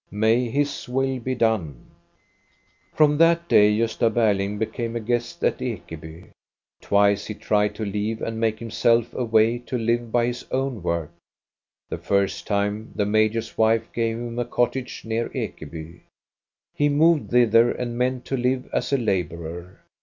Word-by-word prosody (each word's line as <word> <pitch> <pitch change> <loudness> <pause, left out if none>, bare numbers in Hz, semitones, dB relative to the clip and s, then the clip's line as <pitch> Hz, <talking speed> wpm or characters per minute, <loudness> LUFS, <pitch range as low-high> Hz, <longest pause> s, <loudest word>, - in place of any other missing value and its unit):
May 110 +4 +2
His 140 +1 -2
will 135 +1 0
be 130 +2 -3
done! 110 - -1 0.5
" - - -39
From 150 -1 +4
that 170 +1 +4
day 105 -5 +5
Gosta 115 0 +1
Berling 105 -3 +1
became 115 +2 -3
a - - -1
guest 120 +1 -2
at - - +1
Ekeby. 80 +2 -7 0.5
Twice 100 0 +2
he 105 - -5
tried 105 0 0
to 110 - -4
leave 105 +2 -2
and 115 0 -4
make 110 -1 +1
himself 115 +1 +1
a 125 - -2
way 115 +1 +3
to 125 +1 -4
live 115 0 -1
by 120 0 +2
his 120 0 -3
own 130 -4 -2
work. 85 -2 -2 0.8
The - - -5
first 100 -2 0
time 105 +1 -1
the 105 - +1
major's 110 +2 0
wife 110 0 +2
gave 115 -1 -1
him 120 0 -5
a 120 - 0
cottage 125 +2 -2
near 115 +1 -2
Ekeby; 80 +1 -6 0.7
he 145 0 +2
moved 155 +2 +3
thither 120 -1 +5
and 120 -1 -4
meant 125 +1 -1
to 135 - -2
live 125 +1 0
as - - -1
a 140 - +3
laborer. 90 - -3
115 Hz, 160 wpm, -23 LUFS, 105-120 Hz, 0.8 s, day